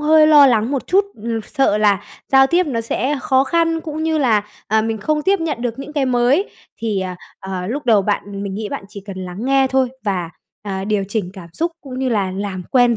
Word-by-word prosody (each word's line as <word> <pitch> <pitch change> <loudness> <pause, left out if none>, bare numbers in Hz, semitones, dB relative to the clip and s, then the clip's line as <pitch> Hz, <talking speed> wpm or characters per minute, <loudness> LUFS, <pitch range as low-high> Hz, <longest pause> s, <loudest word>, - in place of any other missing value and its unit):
hơi 310 +1 +5
lo 295 -2 +8
lắng 230 0 +2
một 275 -3 -2
chút. 395 +2 +3 0.2
Ừm, 230 -1 -2
sợ 270 -7 +1
là 205 -1 +3 0.3
giao 270 0 +7
tiếp 350 +4 +2
nó 235 -6 -1
sẽ 265 +5 -1
khó 265 0 +3
khăn, 330 +2 +1
cũng 315 -1 -5
như 320 -1 +1
là, 225 -7 +3 0.3
à, 220 +1 +3
mình 225 -1 -2
không 305 +3 0
tiếp 390 +1 +2
nhận 300 -7 -2
được 240 0 -3
những 280 +2 -7
cái 280 -3 0
mới. 255 - +2 0.3
Thì, 215 -4 -1
à, 185 -1 -4 0.2
à, 185 -1 -4
lúc 260 +5 -4
đầu 215 -4 +5
bạn 200 0 -2
mình 195 -1 -4
nghĩ 210 0 -4
bạn 195 - -5
chỉ 200 - -9
cần 190 -2 -6
lắng 180 +6 -6
nghe 270 0 +3
thôi 265 -1 +2 0.2
và, 180 -4 -1 0.3
à, 195 -2 -4
điều 205 -2 0
chỉnh 200 -4 -2
cảm 180 -4 -11
xúc 335 - -2
cũng 260 -2 -8
như 265 -1 0
là 200 -5 0
làm 190 -1 -4
quen 245 -3 +4
235 Hz, 235 wpm, -19 LUFS, 200-285 Hz, 0.3 s, lo